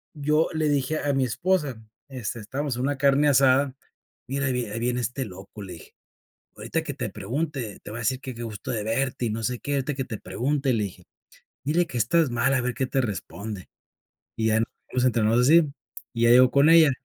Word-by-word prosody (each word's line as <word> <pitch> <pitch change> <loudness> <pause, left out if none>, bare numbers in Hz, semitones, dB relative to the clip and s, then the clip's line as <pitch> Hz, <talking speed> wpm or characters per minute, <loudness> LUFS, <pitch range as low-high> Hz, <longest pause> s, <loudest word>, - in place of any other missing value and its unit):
yo 150 +2 +2
le 155 -1 +1
dije 145 +2 0
a 145 - 0
mi 135 -1 +2
esposa, 145 -2 0 0.3
este, 120 -3 -5
estabamos 130 +4 -3
en 125 - -2
una 140 +1 0
carne 140 +2 +4
asada, 135 0 +4 0.5
mira: 140 +2 -1
"Ahí 130 - +1
vi 125 -1 -1
ahí 105 +2 -5
viene 125 +1 0
este 125 +3 -2
loco", 95 +2 -10
le 95 -2 -8
dije: 80 - -14 0.6
"Ahorita 115 +10 -3
que 150 -3 -4
te 120 -5 -4
pregunte, 125 - -4
te - - -8
va 110 - -6
a - - -5
decir 130 +4 0
que, 130 -2 -7
qué 120 - -6
gusto 110 -1 -7
de 110 -4 -2
verte 125 +3 -1
y - - 0
no 110 +1 -3
sé 125 +2 -1
qué", 145 - -3
ahorita 140 +1 -1
que 135 -1 -3
te 110 -5 -6
pregunte, 130 +8 -1
le 110 -2 +1
dije: 90 -2 -10 0.6
"Dile 165 +5 +2
que 125 - -4
estás 145 +6 +3
mal, 120 +3 +1
a 130 - +2
ver 125 0 -1
qué 130 - -1
te 135 - 0
responde". 100 -2 -5 0.7
Y 110 -1 +1
ya 110 0 +3 0.3
nos 125 - +1
entrenamos 115 -1 +3
así, 155 +5 +6 0.5
y 115 - -3
ya 115 - +5
llegó 125 +1 +7
con 140 +3 +5
ella: 165 -3 +7
125 Hz, 220 wpm, -25 LUFS, 115-140 Hz, 0.7 s, llegó